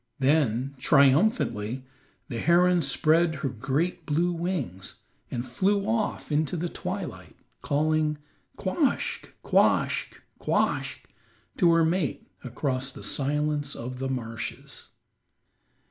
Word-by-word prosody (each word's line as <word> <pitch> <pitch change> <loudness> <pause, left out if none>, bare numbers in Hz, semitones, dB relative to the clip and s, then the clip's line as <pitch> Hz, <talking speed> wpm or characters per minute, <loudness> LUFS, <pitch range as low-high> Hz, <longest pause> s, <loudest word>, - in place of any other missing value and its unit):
Then, 135 -3 +2
triumphantly, 135 - +3 0.4
the 115 - -4
heron 175 +4 +4
spread 160 +3 +3
her 140 -1 -2
great 140 +9 -2
blue 170 +4 +1
wings 165 - -3 0.3
and 120 0 -3
flew 195 +10 +1
off 220 -6 -1
into 155 +3 +1
the 170 +1 -2
twilight, - - -6 0.3
calling 155 +1 +1 0.4
"quoskh, 240 - 0 0.2
quoskh, - - +2 0.2
quoskh" - - 0 0.6
to 175 -4 +5
her 165 -1 +4
mate 165 -3 -1 0.2
across 130 +1 -2
the - - -11
silence 145 0 -1
of 125 +2 -6
the 135 0 -2
marshes. 115 -3 -5
150 Hz, 105 wpm, -27 LUFS, 130-170 Hz, 0.6 s, to